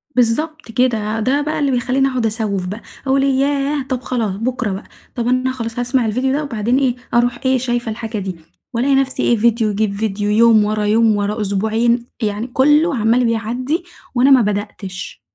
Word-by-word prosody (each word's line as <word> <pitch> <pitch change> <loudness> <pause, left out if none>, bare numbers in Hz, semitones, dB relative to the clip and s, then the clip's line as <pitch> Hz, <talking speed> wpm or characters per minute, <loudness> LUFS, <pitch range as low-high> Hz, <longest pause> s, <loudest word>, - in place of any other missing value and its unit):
بالضبط 255 +4 0
كده، 225 -3 0
ده 265 +6 +1
بقى 300 +1 -2
اللي 285 -2 +1
بيخلّيني 260 +2 +1
أقعُد 255 -3 -1
أسوّف 210 -4 -1
بقى، 205 +5 -6 0.3
أقول 270 +1 +3
ياه! 275 +1 +1
طب 255 -2 -1
خلاص 235 -5 -2
بكرة 235 0 -2
بقى، 195 +3 -5 0.3
طب 240 -2 -2
أنا 255 +1 +1
خلاص 230 -2 -5
هاسمع 245 0 +1
الفيديو 255 +5 0
ده 300 +2 0
وبعدين 240 -2 0
إيه 260 -3 +1 0.2
أروح 240 0 +2
إيه 260 0 +3
شايفة 240 -2 -2
الحاجة 225 0 -5
دي، 190 -2 -4 0.4
وألاقي 265 +4 +2
نفسي 270 -1 0
إيه 235 - +3
فيديو 230 0 +2
يجيب 205 0 0
فيديو، 205 -1 -2
يوم 220 -1 +5
ورا 210 0 -1
يوم، 220 +1 +3
ورا 205 +2 -1
أسبوعين، 220 +4 +1 0.2
يعني 210 +2 -2
كُلّه 295 +5 +3
عَمّال 235 +2 +2
بيعدي 240 +8 -1 0.3
وأنا 260 +3 +4
ما 260 -2 +7
بدأتِش. 205 -3 -4
235 Hz, 180 wpm, -18 LUFS, 215-260 Hz, 0.4 s, ما